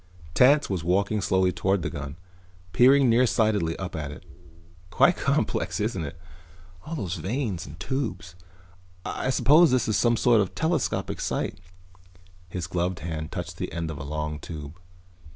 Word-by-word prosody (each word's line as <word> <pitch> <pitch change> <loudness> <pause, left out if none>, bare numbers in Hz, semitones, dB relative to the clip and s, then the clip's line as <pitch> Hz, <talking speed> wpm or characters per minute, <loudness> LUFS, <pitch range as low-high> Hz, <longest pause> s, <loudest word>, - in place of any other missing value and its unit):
Tance 140 - +5
was 95 -4 -3
walking 100 +4 +1
slowly 95 -1 +2
toward 95 0 0
the - - -2
gun, 70 +1 -6 0.6
peering 135 +4 +6
nearsightedly 110 -7 +2
up 90 -3 -5
at 75 -3 -4
it. 75 - -10 0.7
"Quite - - +4
complex, - - -1
isn't 105 -5 -1
it? 75 +2 -7 0.7
All 165 - -6
those 95 - -3
vanes 100 - -3
and 75 +3 -11
tubes. 90 - -3 0.7
I 130 - -2
suppose 150 +5 +5
this 125 -2 +1
is 110 - +1
some 120 -1 +3
sort 115 -3 +4
of 100 - +1
a - - -20
telescopic 160 -3 -1
sight." - - -2 0.9
His 85 -1 -4
gloved 90 0 -2
hand 80 0 -5
touched 90 -2 -6
the - - -4
end 85 -1 -3
of 75 - -7
a - - -5
long 75 +1 -4
tube. 75 +1 -8
95 Hz, 160 wpm, -26 LUFS, 80-120 Hz, 0.9 s, peering